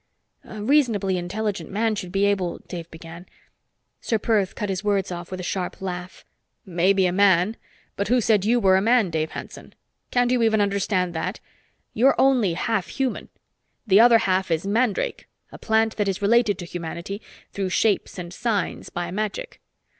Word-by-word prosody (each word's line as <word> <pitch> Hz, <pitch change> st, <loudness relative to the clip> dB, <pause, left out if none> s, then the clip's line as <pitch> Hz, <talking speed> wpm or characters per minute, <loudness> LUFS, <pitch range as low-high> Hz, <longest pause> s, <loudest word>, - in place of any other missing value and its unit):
"A 215 Hz, -1 st, -8 dB
reasonably 225 Hz, -8 st, +2 dB
intelligent 205 Hz, +3 st, -3 dB
man 220 Hz, +2 st, 0 dB
should 185 Hz, -4 st, -5 dB
be 195 Hz, +1 st, +2 dB
able 190 Hz, -4 st, 0 dB
" -, -, -34 dB
Dave 170 Hz, -2 st, -7 dB
began. 165 Hz, +2 st, -11 dB, 0.7 s
Ser 225 Hz, -, 0 dB
Perth 205 Hz, -3 st, 0 dB
cut 210 Hz, -, -3 dB
his 190 Hz, 0 st, -3 dB
words 200 Hz, -3 st, 0 dB
off 175 Hz, -1 st, -6 dB
with 185 Hz, -1 st, -6 dB
a -, -, -5 dB
sharp 180 Hz, 0 st, -3 dB
laugh. 180 Hz, -1 st, -6 dB, 0.4 s
"Maybe 190 Hz, +2 st, +2 dB
a 180 Hz, -, +2 dB
man. 190 Hz, +2 st, +3 dB, 0.4 s
But 200 Hz, -, -2 dB
who 250 Hz, +2 st, +3 dB
said 215 Hz, -3 st, +2 dB
you 235 Hz, +4 st, +3 dB
were 190 Hz, -4 st, +4 dB
a -, -, +2 dB
man, 225 Hz, -3 st, +3 dB
Dave 160 Hz, -1 st, -1 dB
Hanson? -, -, -10 dB, 0.3 s
Can't 245 Hz, 0 st, +2 dB
you 250 Hz, -1 st, +2 dB
even 220 Hz, -1 st, +3 dB
understand 195 Hz, -3 st, 0 dB
that? 160 Hz, -, -3 dB, 0.5 s
You're 260 Hz, +5 st, +3 dB
only 250 Hz, -9 st, +3 dB
half 205 Hz, +1 st, -1 dB
human. 265 Hz, -2 st, -3 dB, 0.6 s
The 200 Hz, -2 st, +5 dB
other 235 Hz, 0 st, +7 dB
half 190 Hz, -4 st, 0 dB
is 165 Hz, +2 st, 0 dB
mandrake 215 Hz, +1 st, 0 dB, 0.2 s
a -, -, -11 dB
plant 220 Hz, 0 st, +1 dB
that 205 Hz, -2 st, 0 dB
is 195 Hz, -1 st, -1 dB
related 210 Hz, -1 st, +3 dB
to 180 Hz, -, -7 dB
humanity 170 Hz, +4 st, -6 dB, 0.3 s
through 195 Hz, -2 st, -3 dB
shapes 205 Hz, +2 st, 0 dB
and 175 Hz, -1 st, -7 dB
signs 215 Hz, -2 st, -2 dB
by 175 Hz, 0 st, -4 dB
magic. 215 Hz, -, -4 dB
200 Hz, 175 wpm, -23 LUFS, 180-220 Hz, 0.7 s, other